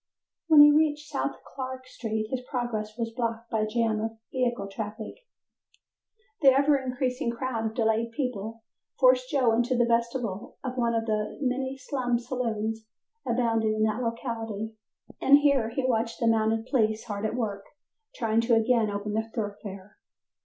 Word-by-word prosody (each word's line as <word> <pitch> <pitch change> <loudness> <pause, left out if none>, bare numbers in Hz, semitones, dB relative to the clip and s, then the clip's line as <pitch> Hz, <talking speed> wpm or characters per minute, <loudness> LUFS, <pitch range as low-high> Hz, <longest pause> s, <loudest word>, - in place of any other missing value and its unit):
When 310 -2 +8
he 295 - +8
reached 300 0 +2
South - - -1
Clark 260 -1 -6
Street, 220 -3 -3
his 260 -1 -1
progress 220 -4 -3
was 230 -1 -2
blocked 230 -1 -3
by 220 - +1
a 215 - +1
jam 220 -1 0
of 225 0 -4
vehicle 245 -5 0
traffic. 210 +2 -6 1.3
The 280 - +4
ever 280 +2 +4
increasing 255 -2 -1
crowd 235 -1 -2
of 220 - -5
delayed 225 0 +1
people 230 -4 -4 0.4
forced 255 -1 +5
Joe 260 -5 +3
into 240 +2 +1
the 240 - +4
vestibule 235 -3 -1
of 255 -1 -4
one 235 -2 +1
of 225 0 0
the 215 -1 -2
many 265 0 -1
slum 255 -2 -1
saloons 225 -3 -3 0.4
abounding 225 -3 +1
in 215 - +1
that 220 +2 +1
locality, 225 -2 -3 0.5
and 280 +1 +7
here 280 -6 +3
he 255 +3 -2
watched 230 -2 0
the 235 - 0
mounted 225 0 +2
police 220 -5 +1
hard 205 -2 -5
at 220 +1 -1
work 205 -5 -2 0.5
trying 225 -1 +1
to 230 0 +3
again 225 -1 +3
open 205 +1 -3
the 220 +1 -1
thoroughfare. 205 -3 -6
230 Hz, 160 wpm, -27 LUFS, 220-255 Hz, 1.3 s, When